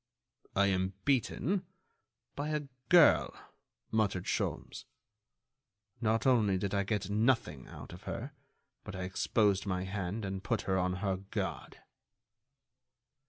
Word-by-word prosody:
"I 100 - +5
am 95 -1 +1
beaten... 145 - +1 0.7
by 145 +2 -2
a 150 -1 -1 0.3
girl," - - +6 0.6
muttered 100 -5 +1
Sholmes. - - -2 1.2
"Not 110 -1 +1
only 110 -7 +4
did 100 +1 -2
I 100 - +2
get 100 -1 -2
nothing 105 - +1
out - - -10
of 90 +5 -12
her 125 +5 -4 0.5
but - - -7
I 95 - -4
exposed 95 +2 +1
my 90 -1 -1
hand 100 +2 -3
and 95 0 -4
put - - 0
her 95 - 0
on 90 0 +1
her 95 -1 +1
guard." 95 +1 -5
100 Hz, 125 wpm, -32 LUFS, 95-115 Hz, 1.2 s, girl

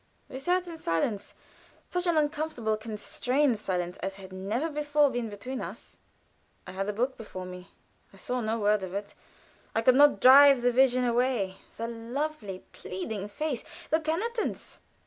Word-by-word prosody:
We 260 - -6
sat 360 +5 +1
in 330 -2 -8
silence 195 - -1 0.6
such 360 0 0
an 340 -2 +3
uncomfortable 295 -7 0
constrained 230 +4 0
silence, 180 -3 -2
as 195 +1 -4
had 190 -1 -11
never 210 +11 -2
before 295 -1 +2
been 240 -2 -2
between 230 +6 -6
us. - - -7 0.7
I 185 - -8
had 195 +2 -3
a - - -1
book 250 +5 -1
before 185 -4 -7
me. 180 0 -9 0.4
I - - -17
saw 250 0 -2
no 220 0 -1
word 210 -1 +2
of 190 0 -6
it. 200 0 -5 0.6
I 225 - +1
could 255 - +6
not 290 +2 +6
drive 275 0 +8
the 245 - +4
vision 255 0 +4
away 240 -5 +1 0.2
the 230 - -3
lovely, 235 -3 -4
pleading 195 +2 -5
face, 280 +3 -3 0.3
the 315 - +4
penitence. 405 +9 -3
240 Hz, 165 wpm, -28 LUFS, 205-290 Hz, 0.7 s, drive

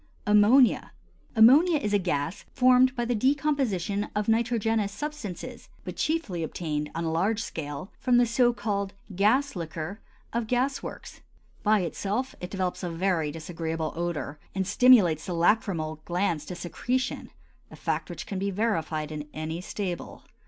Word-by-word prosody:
AMMONIA. 210 +5 +5 0.4
Ammonia 285 +10 +7
is 210 -8 -2
a 205 - +4
gas 165 -2 -2
formed 255 0 +5
by 240 -2 -1
the 245 - 0
decomposition 255 - 0
of 210 0 -1
nitrogenous 225 -2 +1
substances, 215 - -6 0.2
but - - -5
chiefly 300 - -1
obtained, 150 -2 -3
on 165 - -2
a 165 - -1
large 195 +7 +1
scale, 145 +3 -6
from 250 -2 +3
the 245 - +5
so 240 +1 +3
called 200 -3 -3 0.2
"gas 250 +8 +2
liquor" 165 +3 -5 0.3
of 230 -1 -1
gas 255 +4 0
works. - - -9 0.4
By 215 -1 +3
itself 205 - -2
it 180 - -5
develops 185 -2 -2
a 180 - -3
very 165 -3 0
disagreeable 160 0 -4
odor 165 -3 -3 0.2
and 190 -1 0
stimulates 200 - +5
the 180 - -2
lachrymal 165 -4 +1
glands 175 -4 -1
to 180 - -5
secretion—a 245 +9 -4
fact - - -2
which - - -6
can 195 - -4
be 200 +1 -1
verified 165 -7 -1
in 150 -1 -5
any 160 +2 -4
stable. 185 -2 -5
200 Hz, 150 wpm, -27 LUFS, 165-235 Hz, 0.4 s, Ammonia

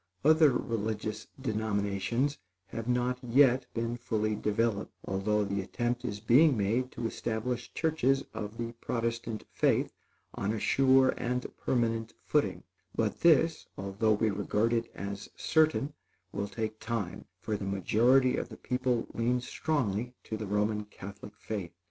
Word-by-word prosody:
Other 155 0 +7
religious 110 -2 -2
denominations 110 +3 -1 0.3
have 115 +2 -5
not 125 0 +1
yet 125 +1 +4
been 115 +1 -1
fully 110 -3 -1
developed; 105 0 0
although 105 +2 +1
the 100 0 -1
attempt 120 +5 -2
is 105 -4 -3
being 130 +6 +5
made 115 +6 0
to - - -4
establish 120 +2 -2
churches 145 -4 +2
of 110 0 -5
the 115 0 -3
Protestant 115 -2 -2
faith - - +2 0.4
on 100 +2 -1
a 110 - -2
sure 130 +2 +4
and 125 +1 -1
permanent 115 -2 -1
footing; - - +1 0.3
but - - 0
this, 165 -1 +4
although 100 +3 +1
we 110 +1 +2
regard 105 +3 +1
it 115 0 0
as 100 0 -5
certain, 155 -2 +2 0.4
will 100 0 -2
take 110 +1 -4
time, 115 -6 -3
for 105 +2 -2
the 100 - -4
majority 120 +7 +3
of - - -3
the - - -10
people 125 -2 0
lean 120 +2 +1
strongly 125 -4 -1
to 110 - -4
the 110 -1 -5
Roman 105 +1 0
Catholic 100 0 -10
faith. 100 -8 -5
115 Hz, 140 wpm, -30 LUFS, 105-125 Hz, 0.4 s, Other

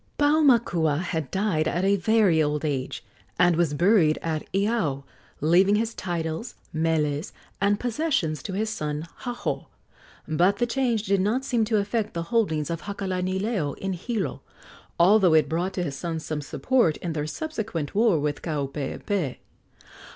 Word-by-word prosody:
Paumakua 240 - +3
had 160 -5 -3
died 190 -6 0
at 175 +3 0
a 200 +1 +4
very 200 -4 +3
old 150 0 0
age, 135 -3 -3 0.3
and 175 -1 +4
was 160 -3 +1
buried 175 -2 +4
at 160 -2 -3
Iao, 195 -9 0 0.4
leaving 180 +6 +4
his 225 +2 0
titles, 170 +3 -4 0.2
meles 155 -1 0 0.3
and 200 +1 +2
possessions 240 - -1
to 190 - -6
his 215 +3 -1
son, 150 -7 -3
Haho; 245 -1 -4 0.6
but 175 +6 +2
the 240 - +2
change 240 -3 0
did 200 -2 +1
not 235 +7 0
seem 235 -4 +1
to 215 0 +1
affect 210 0 -1
the 170 - -1
holdings 160 -10 +1
of 165 -1 -3
Hakalanileo 190 - -2
in 195 0 -3
Hilo, 205 +4 -3 0.6
although 185 -1 +6
it 155 - +4
brought 175 +5 -1
to 180 - -1
his 140 -5 -4
sons 165 +1 -4
some 155 -1 -3
support 175 - +1
in 170 -2 -4
their 150 -1 -2
subsequent 220 - -4
war 210 -6 +3
with 145 0 -2
Kaupeepee. 150 - -3
180 Hz, 150 wpm, -25 LUFS, 155-215 Hz, 0.6 s, although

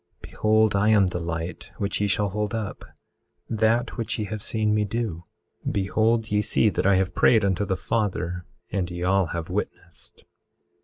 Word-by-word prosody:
Behold 110 -1 +2
I 100 +2 +3
am 105 -3 +5
the 90 -1 -2
light 85 0 -5
which 100 0 -2
ye 105 - +2
shall 100 +1 +1
hold 105 +2 -2
up—that 110 +2 -3
which 115 -1 -2
ye 105 - -2
have 105 +1 -5
seen 110 0 0
me 105 0 +2
do. 105 -5 -3 0.5
Behold 110 +3 +1
ye 105 0 +3
see 105 +1 +3
that 100 - 0
I 100 - +5
have 95 0 +1
prayed 110 -4 +4
unto 100 +1 +1
the 95 -2 -1
Father, 90 -5 -2 0.3
and 95 -3 -1
ye 85 0 -5
all 95 0 +2
have 85 -1 -5
witnessed. - - -6
105 Hz, 170 wpm, -25 LUFS, 95-110 Hz, 0.5 s, am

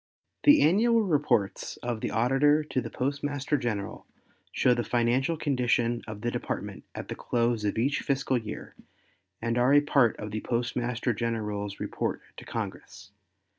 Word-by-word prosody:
The 295 +1 +7
annual 225 +8 +4
reports 140 - 0
of 120 -2 -2
the - - -1
Auditor 135 +7 +3
to 140 -3 -2
the - - -6
Postmaster 145 +2 -1
General 110 -7 -3 0.4
show 125 - +3
the 120 -1 -1
financial 120 +7 +1
condition 120 -4 +1
of 105 -1 -7
the 120 +1 -1
Department - - -4
at - - -6
the - - -4
close 120 -2 0
of 105 - -1
each 135 +5 +1
fiscal 135 -2 0
year 110 -2 -8 0.7
and 115 +1 0
are 130 +4 +5
a 145 - +7
part 140 -6 +3
of 105 0 -6
the 110 0 -3
Postmaster 120 0 -1
General's 105 -3 -3
report - - -3
to - - -10
Congress. 90 +2 -6
120 Hz, 155 wpm, -28 LUFS, 115-140 Hz, 0.7 s, The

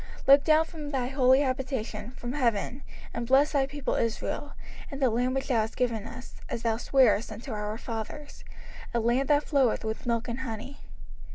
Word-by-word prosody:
05:026:015 - - -15
Look 280 +1 +8
down 315 +1 +4
from 310 -3 -8
thy 260 -4 -1
holy 260 -1 +4
habitation, 255 -5 -3
from 245 +1 -5
heaven, 245 -1 0 0.3
and 235 - -3
bless 275 +4 +5
thy 275 -3 +2
people 285 0 -3
Israel, 235 +5 -2 0.4
and 275 -3 -6
the 260 -4 +3
land 250 +3 0
which 270 +1 -2
thou 250 - +3
hast 220 +1 -4
given 230 -4 -1
us, 245 +2 -11
as 230 - -4
thou 225 -1 +1
swarest 240 -4 +3
unto 225 +5 -7
our 210 0 -3
fathers, 230 +5 -7 0.5
a - - +3
land 240 +4 +1
that 295 0 +4
floweth 270 -7 +2
with 220 +2 -4
milk 235 0 0
and 240 +1 -3
honey. 255 +2 -6
250 Hz, 190 wpm, -28 LUFS, 230-275 Hz, 0.5 s, Look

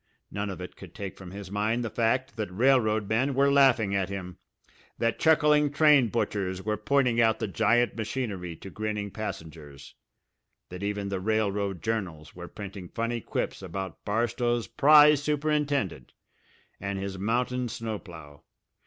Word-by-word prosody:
None 100 0 -3
of 95 - -6
it 90 - -8
could 90 -3 -13
take 100 -2 -6
from 95 -2 -10
his 100 0 -9
mind 110 +4 0
the 110 - -4
fact 125 +3 0
that 110 -3 -3
railroad 110 -1 +2
men 130 +6 +1
were 140 +1 +4
laughing 130 -8 +4
at 95 -1 0
him, 90 -2 -6 0.6
that 115 -1 0
chuckling 150 -2 +4
train 145 -4 +5
butchers 95 -4 -2
were 110 0 0
pointing 120 +2 +2
out 110 -1 +3
the - - -3
giant 115 +3 +2
machinery 105 -7 -4
to 95 - -11
grinning 105 -1 -3
passengers, 80 -9 -8 0.8
that 90 +1 -8
even 100 0 -2
the 95 -1 -2
railroad 100 -3 -1
journals 90 -9 -3
were 90 0 -8
printing 100 -3 -8
funny 115 0 -2
quips - - -3
about 95 +1 -6
Barstow's 120 +2 0
prize 150 0 +6
superintendent 145 - -1 0.7
and 100 0 -3
his 95 -1 -5
mountain 125 +4 -1
snow 110 -2 -4
plough. 80 -6 -12
110 Hz, 155 wpm, -27 LUFS, 95-120 Hz, 0.8 s, prize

